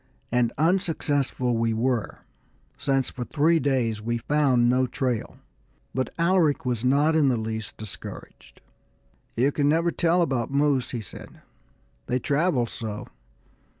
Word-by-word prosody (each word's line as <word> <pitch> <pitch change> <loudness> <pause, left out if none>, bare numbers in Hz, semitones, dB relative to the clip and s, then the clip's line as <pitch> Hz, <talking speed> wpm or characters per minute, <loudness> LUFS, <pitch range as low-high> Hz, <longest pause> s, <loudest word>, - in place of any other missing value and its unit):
And 120 -1 +2
unsuccessful 150 -7 +1
we 115 0 0
were, 120 -1 -1 0.5
since 135 -2 0
for 125 - -5
three 160 +5 +2
days 125 -6 0
we 120 +2 -1
found 130 -2 +2
no 130 +1 +2
trail. 125 -2 -2 0.6
But 130 0 -1
Alaric 170 -5 +2
was 120 -2 -1
not 145 +5 +3
in 150 -4 +4
the 125 - +1
least 110 -1 -5
discouraged. 60 - -10 0.8
"You 130 +4 +3
can 145 0 +1
never 165 +2 +2
tell 175 +1 +2
about 130 -8 -1
moose," 140 -2 +1
he 120 - -4
said; 100 - -12 0.6
"they 125 - +1
travel 140 0 +1
so. 110 -2 -6
130 Hz, 135 wpm, -25 LUFS, 120-150 Hz, 0.8 s, in